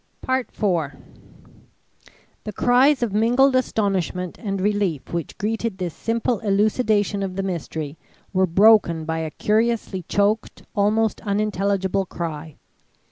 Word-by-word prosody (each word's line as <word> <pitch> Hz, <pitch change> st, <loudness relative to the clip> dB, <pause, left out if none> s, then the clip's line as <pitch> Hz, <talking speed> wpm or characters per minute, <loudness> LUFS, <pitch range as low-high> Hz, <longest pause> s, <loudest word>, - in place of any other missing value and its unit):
IV 200 Hz, -, -1 dB, 1.5 s
The 210 Hz, -, -5 dB
cries 255 Hz, +2 st, +4 dB
of 220 Hz, -5 st, -2 dB
mingled 245 Hz, +5 st, +3 dB
astonishment 190 Hz, -7 st, -1 dB
and 195 Hz, -3 st, -3 dB
relief 195 Hz, -8 st, -1 dB
which 170 Hz, -3 st, -4 dB
greeted 220 Hz, 0 st, -2 dB
this 180 Hz, -4 st, -3 dB
simple 230 Hz, -1 st, -1 dB
elucidation 205 Hz, 0 st, +1 dB
of 190 Hz, -2 st, -3 dB
the 195 Hz, -, -2 dB
mystery 160 Hz, -4 st, -4 dB, 0.3 s
were 190 Hz, 0 st, +3 dB
broken 180 Hz, -3 st, +4 dB
by 160 Hz, 0 st, -2 dB
a 160 Hz, -1 st, -3 dB
curiously 215 Hz, +1 st, 0 dB
choked, 205 Hz, +2 st, 0 dB
almost 215 Hz, +2 st, +1 dB
unintelligible, 200 Hz, -2 st, 0 dB
cry. 160 Hz, -3 st, -6 dB
200 Hz, 115 wpm, -22 LUFS, 180-220 Hz, 1.5 s, cries